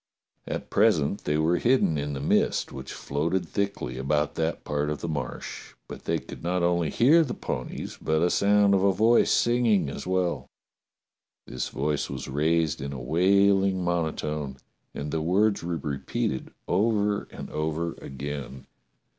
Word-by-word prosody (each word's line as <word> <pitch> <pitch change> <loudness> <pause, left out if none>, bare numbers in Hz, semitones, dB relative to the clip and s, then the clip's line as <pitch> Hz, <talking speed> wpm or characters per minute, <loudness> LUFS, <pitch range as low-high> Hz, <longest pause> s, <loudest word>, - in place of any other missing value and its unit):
At - - -5
pres - - +4
ent 75 +8 -3
they 75 +1 +1
were 80 +3 +2
hidden 125 -10 +3
in 75 0 -2
the 70 - -4
mist 70 - +1
which 65 0 -7
floated 85 +5 -2
thickly 100 -11 -3
about 75 +3 0
that 80 +1 -2
part 75 0 -1
of 75 - -3
the - - -4
Marsh, 70 -6 -5
but - - -9
they - - +1
could - - -10
not 90 +1 0
only 85 -2 +2
hear 155 - +5
the 130 - -4
ponies 65 - -5
but 80 +1 +1
a 90 - +3
sound 100 0 +4
of 95 - +3
a 100 - +5
voice 110 +5 +4
singing 120 - +3
as - - -7
well. 90 -8 0 1.0
This 65 - -4
voice 75 +2 -1
was 65 -2 -5
raised 75 +2 +1
in 70 +1 -4
a 65 - -6
wailing 95 +6 +3
monotone 75 -5 -2 0.4
and 70 +1 -4
the 80 - -1
words 100 +6 +2
were 85 0 -2
repeated 70 -2 -3 0.2
over 105 +1 +1
and - - -9
over 80 +2 -2
again. 70 -1 -6
80 Hz, 165 wpm, -26 LUFS, 70-95 Hz, 1.0 s, hear